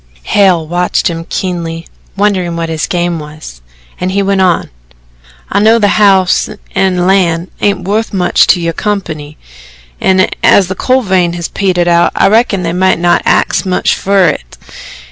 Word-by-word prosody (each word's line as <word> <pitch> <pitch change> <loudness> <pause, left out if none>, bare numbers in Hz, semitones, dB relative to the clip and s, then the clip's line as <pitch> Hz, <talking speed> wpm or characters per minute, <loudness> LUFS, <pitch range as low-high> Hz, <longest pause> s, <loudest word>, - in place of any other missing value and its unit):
Hale 185 -5 +2
watched 175 +1 -1
him 165 0 -7
keenly, 170 -3 -4 0.3
wondering 190 -4 0
what 165 -1 -3
his 160 -1 -3
game 175 -1 -2
was 150 - -11 0.4
and 180 - -2
he 200 +1 0
went 195 0 0
on: 180 -3 +1 0.8
"I 200 - +1
know 220 +2 +4
the 205 -3 +2
house 190 -3 +3 0.2
an' 190 -2 0
land 180 -2 +1
ain't 200 -2 0
wuth 220 +3 -1
much 185 -4 +2
to - - +3
your 170 -1 -2
company, 155 -9 -4 0.6
an' 190 0 +3 0.2
as 190 -3 +4
the 190 - -3
coal 255 +6 +1
vein 185 -4 +1
has 170 -1 -5
petered 180 -3 0
out, 170 0 +3
I - - +3
reckon 215 -3 +1
they 165 0 -2
might 185 0 +2
not 175 +1 +2
axe - - +1
much 185 -1 0
fer 195 -3 +2
it." - - -6
180 Hz, 165 wpm, -11 LUFS, 170-195 Hz, 0.8 s, know